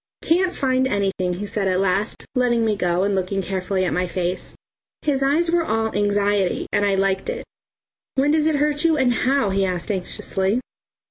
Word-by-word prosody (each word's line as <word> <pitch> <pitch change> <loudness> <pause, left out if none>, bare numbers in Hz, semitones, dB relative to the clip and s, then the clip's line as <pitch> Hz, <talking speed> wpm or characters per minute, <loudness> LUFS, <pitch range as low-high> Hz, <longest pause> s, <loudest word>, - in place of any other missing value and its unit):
"Can't 360 +2 +2
find 260 -1 +1
anything," 195 -5 -1
he 190 +4 -4
said 205 -1 -1
at 185 -1 +1
last, 195 +2 0
letting 240 -3 +2
me 215 -1 +1
go 180 -1 0
and 200 0 +1
looking 190 +1 -1
carefully 185 0 -1
at - - -1
my 180 0 0
face. 180 +1 -3 0.5
His 280 -3 +1
eyes 310 +5 +2
were 345 -1 +2
all 225 -5 -1
anxiety; 205 -1 +1
and 205 - +2
I 200 -1 +2
liked 195 - 0
it. 485 0 -4 0.7
"When 275 +2 +3
does 310 0 +2
it 315 - +2
hurt 295 +1 +1
you, 325 -2 +3
and 255 -3 +3
how?" 255 -5 +1
he 195 0 +1
asked 185 +2 -1
anxiously. 190 +2 -1
205 Hz, 190 wpm, -22 LUFS, 190-270 Hz, 0.7 s, When